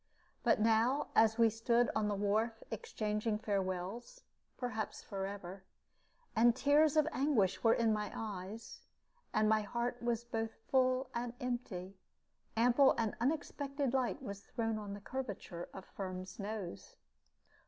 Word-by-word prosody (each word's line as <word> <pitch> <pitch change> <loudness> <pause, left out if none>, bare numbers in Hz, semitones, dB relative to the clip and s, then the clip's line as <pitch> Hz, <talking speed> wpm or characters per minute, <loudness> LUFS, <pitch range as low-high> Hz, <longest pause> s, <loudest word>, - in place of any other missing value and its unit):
But - - +3
now, 230 +6 +3
as 220 0 +5
we 230 -1 +5
stood 235 +2 +2
on 215 -1 +2
the 205 - 0
wharf 220 +3 0
exchanging 210 0 -1
farewells, 200 - -3 0.3
perhaps 225 -4 -3
forever, 195 -1 -5 0.7
and 235 +1 +5
tears 290 +3 +4
of 305 0 +5
anguish 250 -9 +2
were 225 -1 +6
in 225 -2 +3
my 210 -1 -2
eyes, 210 0 -6 0.5
and 215 0 +3
my 215 0 +4
heart 235 +3 -2
was 235 -1 0
both 225 -1 -3 0.2
full 255 0 +3
and 240 0 -3
empty, 200 -7 -4 0.6
ample 245 +4 +5
and 225 -2 0
unexpected 280 -1 -1
light 265 +1 0
was 200 -5 -6
thrown 225 -1 -2
on 200 -1 -5
the 205 - -10
curvature 205 -8 -5
of 190 - -9
Firm's 185 0 -6
nose. 200 - -5
225 Hz, 135 wpm, -35 LUFS, 205-245 Hz, 0.7 s, were